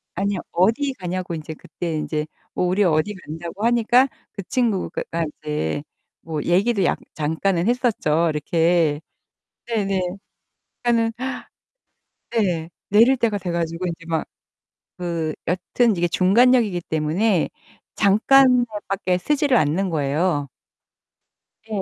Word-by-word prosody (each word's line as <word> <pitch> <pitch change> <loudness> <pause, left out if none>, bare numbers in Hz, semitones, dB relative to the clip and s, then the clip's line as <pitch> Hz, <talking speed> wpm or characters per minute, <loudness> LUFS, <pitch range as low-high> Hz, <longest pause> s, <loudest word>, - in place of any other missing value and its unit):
아니요. 195 0 -1
어디 230 +10 +2
가냐고 185 -2 -4
인제 160 0 -6
그때 170 +1 -5
인제 150 0 -2 0.3
어, - - 0
우리 185 +3 +2
어디 170 +4 +2
간다고 170 +4 -6
하니까 240 +2 +4 0.2
그 200 - -7
친구가 230 -3 -1
가 165 0 0 0.2
이제 150 - -2 0.4
뭐 155 -3 -4
얘기도 195 +3 +2
약 - - +1
잠깐은 170 +5 0
했었죠. 185 - +1
이렇게. 160 0 +1 0.7
네네. 200 -5 0 0.8
그러니까는 230 -1 +2 1.2
네. 175 -8 0 0.2
내릴 230 +6 +5
때가 220 -4 +1
돼 180 -2 -4
가지고 170 +1 -2
인제 170 0 -6
막 160 -1 -1 0.7
그 170 -3 -2
여튼 185 +5 +1
이게 175 0 +2
중간역이기 205 +1 +3
때문에 165 +5 0 0.5
잠깐만 250 +5 +5 0.2
밖에 190 -2 0
서지를 285 +4 +2
않는 170 +6 +1
거예요. 150 0 0 1.2
예. 210 -3 -2
185 Hz, 255 characters per minute, -22 LUFS, 165-225 Hz, 1.2 s, 내릴